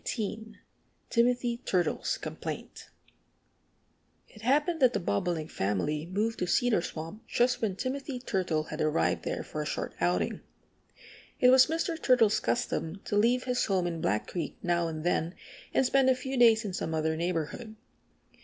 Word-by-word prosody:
XVIII 220 -1 -4 0.6
TIMOTHY 240 0 +2
TURTLE'S 185 - 0
COMPLAINT - - -7 1.4
IT 215 - -15
happened 295 +8 +2
that 255 -3 +5
the 205 - 0
Bobolink 160 - -1
family 145 - -1
moved 215 +5 -1
to 180 - -1
Cedar 235 -1 +2
Swamp 165 +5 -7
just 245 +1 +1
when 205 -5 0
Timothy 265 +4 -3
Turtle 185 -10 -1
had - - -4
arrived 90 - +1
there - - -2
for - - -5
a - - -3
short - - -3
outing. 90 -1 0 1.0
It 250 - +6
was 260 0 +7
Mr. 325 0 -2
Turtle's 230 -5 +4
custom 195 -7 -2
to - - -2
leave 240 +4 +3
his 250 -1 0
home 190 -3 +1
in 165 -2 -3
Black 105 +2 0
Creek 170 -5 -5
now 170 -1 +1
and 155 -1 -5
than 175 0 0 0.4
and 265 - +2
spend 265 +1 +4
a 260 - +4
few 265 +1 -5
days 230 -3 +5
in 195 - -4
some 160 -3 -2
other 160 0 0
neighborhood. 175 +7 -3
210 Hz, 160 wpm, -29 LUFS, 165-250 Hz, 1.4 s, was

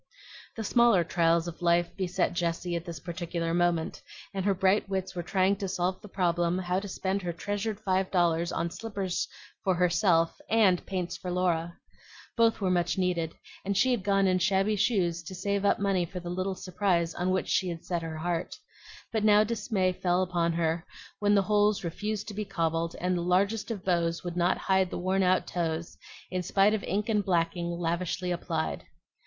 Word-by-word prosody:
The 225 - -4
smaller 235 -5 +4
trials 170 0 +2
of 170 0 -7
life 170 0 +2
beset 185 -1 0
Jessie 175 0 -1
at 170 0 -4
this 170 -3 -6
particular 170 0 -3
moment, 175 -2 0 0.3
and 195 -1 -2
her 200 -1 +3
bright 190 +2 +2
wits 190 -1 -2
were 175 - -3
trying 190 +3 +1
to 195 - -3
solve 185 0 -1
the - - -10
problem 175 -2 +1
how 180 0 0
to 205 - -7
spend 190 +1 -2
her 175 -2 -2
treasured 205 +4 -3
five 190 -2 0
dollars 170 -2 +2
on 170 0 -2
slippers 200 -5 -3 0.4
for 190 -2 +2
herself 175 -1 +2
and 210 -5 +4
paints 180 -3 -3
for 180 - -6
Laura. 175 -2 0 0.6
Both 230 -1 +3
were 185 -2 +1
much 175 0 +1
needed, 175 -3 0 0.3
and 200 0 -1
she 260 +6 +4
had 240 -6 0
gone 195 0 +3
in 185 -1 +3
shabby 195 +2 +2
shoes 185 -5 +1
to 165 +3 -8
save 200 +2 -1
up - - +4
money 195 -3 +1
for 180 - -6
the 175 0 -6
little 185 +1 -2
surprise 180 -3 0
on 180 +1 -1
which 185 0 0
she 185 - +1
had 165 -1 -6
set 175 -2 -1
her 160 -1 -5
heart; 170 +1 -2 0.6
but 220 -2 0
now 210 0 +6
dismay 205 -4 0
fell 180 0 +1
upon 170 -2 0
her 165 0 0 0.4
when 205 0 +3
the 200 - +4
holes 210 0 +2
refused 210 +5 -3
to - - -6
be 210 +1 -3
cobbled, 165 -3 -1
and 180 +1 0
the 175 - -1
largest 200 +6 +1
of 210 -5 -5
bows 170 -2 +1
would 175 -1 -4
not 175 +1 +2
hide 190 -1 +2
the - - -4
worn 185 +2 +1
out 185 0 +3
toes 165 -1 -3 0.4
in 185 0 -1
spite 195 +3 +3
of 215 - -1
ink 205 +2 -1
and 210 -3 +1
blacking 170 -1 0
lavishly 175 +1 -2
applied. 80 - -2
180 Hz, 195 wpm, -28 LUFS, 170-195 Hz, 0.6 s, now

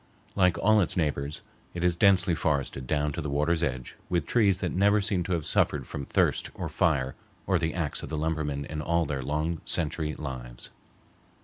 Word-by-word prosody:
Like 90 -3 +3
all 110 +3 +4
its 90 - -1
neighbors, 75 -2 -1 0.3
it 85 - -3
is 90 -1 +3
densely 95 -1 +4
forested 70 -5 -1
down 75 0 0
to 85 - -4
the 75 - -3
water's 75 +4 +1
edge 65 -6 -3
with 85 -4 0
trees 100 - +3
that 90 -2 -2
never 100 +3 +3
seem 100 -3 0
to 90 - -1
have 80 -4 -1
suffered - - +1
from 70 - -6
thirst - - +1
or - - -4
fire 65 0 +1 0.3
or 95 -3 +2
the 80 0 -1
axe 85 -5 -2
of - - -7
the 80 - -3
lumberman 75 -2 -1
in 75 +1 -5
all 85 +2 +1
their 70 -2 -3
long 75 +4 -2
century 75 -1 -1
lives. 65 -4 -7
80 Hz, 195 wpm, -28 LUFS, 70-90 Hz, 0.3 s, all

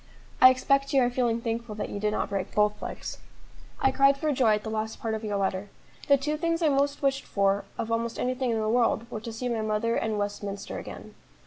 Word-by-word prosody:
I 255 - +11
expect 275 +2 +1
you 270 - +5
are 245 - +1
feeling 240 -2 0
thankful 230 -1 -3
that 210 - -4
you 205 - -5
did 210 +1 +1
not 210 - -2
break 195 -2 -3
both 210 0 +2
legs. - - -6 0.6
"I 265 - +3
cried 275 +1 +4
for 305 +1 0
joy 245 -6 +3
at 210 - -5
the 220 - -4
last 220 0 -3
part 225 -1 -2
of 220 0 -4
your 205 -2 -1
letter. 195 +1 -1 0.4
The 280 - +6
two 300 +3 -2
things 335 +1 0
I 310 - +4
most 280 +1 +1
wished 275 0 +1
for 200 0 +1
of 225 - -3
almost 230 0 -1
anything 255 0 -1
in 225 -1 0
the 215 - -1
world 230 0 +2
were 215 - -5
to 230 - -6
see 230 +3 -4
my 235 -2 -1
mother 215 +2 0
and 220 -1 -1
Westminster 205 0 -4
again. - - -9
230 Hz, 235 wpm, -27 LUFS, 210-265 Hz, 0.6 s, I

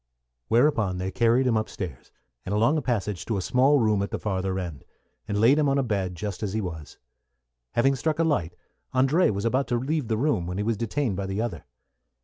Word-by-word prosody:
Whereupon 115 - +2
they 95 +1 -3
carried 120 +3 +3
him 125 -3 +2
up 110 0 0
stairs, 80 -10 -7 0.3
and 100 - -2
along 115 +8 +3
a 155 - 0
passage, 105 - -2
to 110 - -1
a - - -1
small 135 +6 +4
room 110 -5 +2
at 100 - -2
the - - -3
farther 95 -2 -2
end, 85 -7 -5 0.4
and 105 -1 -1
laid 125 +7 +5
him 145 -2 +3
on 135 - +2
a 140 - +2
bed 100 -6 -2
just 100 +1 -5
as 100 -3 -2
he 110 - 0
was. 80 -7 -6 0.8
Having 135 +3 +3
struck 155 +4 -1
a 165 - +2
light, 90 - 0 0.4
André 135 +8 +4
was 100 +1 -2
about 130 +4 +1
to 120 - 0
leave 135 +2 -1
the 110 - 0
room, 120 - 0
when 90 +1 -4
he 105 - -1
was 115 +1 0
detained 115 -1 -1
by 100 -1 -3
the 95 +2 -3
other. 105 -10 -3
110 Hz, 225 wpm, -26 LUFS, 95-130 Hz, 0.8 s, laid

